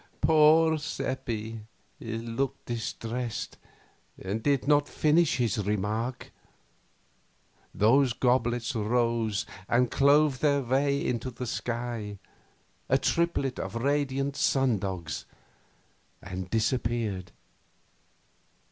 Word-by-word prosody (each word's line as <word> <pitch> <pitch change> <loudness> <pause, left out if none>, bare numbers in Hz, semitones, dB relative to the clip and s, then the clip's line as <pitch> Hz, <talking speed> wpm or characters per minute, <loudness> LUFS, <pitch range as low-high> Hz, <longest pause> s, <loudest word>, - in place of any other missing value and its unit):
Poor 160 +1 +5
Seppi 115 -6 -4 0.4
looked 115 +3 -3
distressed, 115 0 -4 0.6
and 100 +4 -3
did 140 +1 +1
not 145 0 +3
finish 155 0 +2
his 115 -4 0
remark. 105 +5 -2 1.4
The 130 +5 +4
goblets 120 -2 +1
rose 115 -1 0 0.2
and 120 0 +2
clove 140 -1 +4
their 140 -2 +2
way 140 +3 +1
into 125 +1 -1
the 125 0 -6
sky, 115 -3 -4 0.7
a 135 - +5
triplet 140 -4 0
of 95 +3 -5
radiant 140 +2 0
sundogs, 95 - 0 0.9
and 95 0 -6
disappeared. 110 -5 -1
120 Hz, 85 wpm, -28 LUFS, 110-140 Hz, 1.4 s, Poor